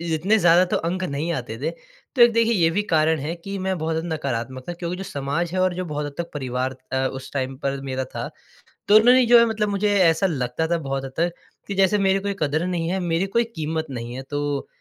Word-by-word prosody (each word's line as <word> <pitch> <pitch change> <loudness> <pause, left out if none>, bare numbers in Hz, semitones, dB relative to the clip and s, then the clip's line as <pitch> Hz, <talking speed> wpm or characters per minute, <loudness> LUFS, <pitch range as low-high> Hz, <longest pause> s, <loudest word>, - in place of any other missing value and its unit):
इतने 195 +8 +2
ज़्यादा 175 0 +5
तो - - 0
अंक 180 +3 -2
नहीं 155 +1 -2
आते 120 -5 -5
थे। - - -1 0.4
तो 245 - +3
एक 235 0 +8
देखिए 230 0 +3
ये 170 -5 +3
भी 190 +5 0
कारण 160 -3 +2
है 155 +5 -3
कि 195 +4 -6
मैं 190 -1 -1
बहुत 160 0 -2
ज़्यादा 160 0 -3
नकारात्मक 130 -2 -4
था। 175 - -2
क्योंकि 175 +1 -4
जो 195 - -5
समाज 145 +3 -3
है 185 - 0
और 185 -1 +2
जो 185 0 -3
बहुत 150 -2 -3
हद 145 - -6
तक 170 0 -4
परिवार 130 -1 -2 0.2
अ, 130 0 +1
उस 130 0 -8
टाइम 135 -1 -2
पर 140 -1 -2
मेरा 130 -1 -3
था, - - -3 0.6
तो 205 - +6
उन्होंने 245 +3 +7
जो 235 0 +7
है 235 - +6
मतलब 215 -2 -1
मुझे 205 +1 +1
ऐसा 165 +1 +4
लगता 135 0 -2
था 170 0 +1
बहुत 135 -3 -3
हद 135 - -7
तक 170 +1 +1 0.3
कि 200 - -4
जैसे 195 +2 +3
मेरे 195 -1 +2
कोई 200 0 -2
क़द्र 155 +3 0
नहीं 170 -2 -1
है, 190 +1 -1
मेरी 175 +1 0
कोई 235 +4 +2
कीमत 160 0 -2
नहीं 120 -2 -6
है। 130 - -5
तो 145 -1 -2
165 Hz, 245 wpm, -23 LUFS, 140-190 Hz, 0.6 s, एक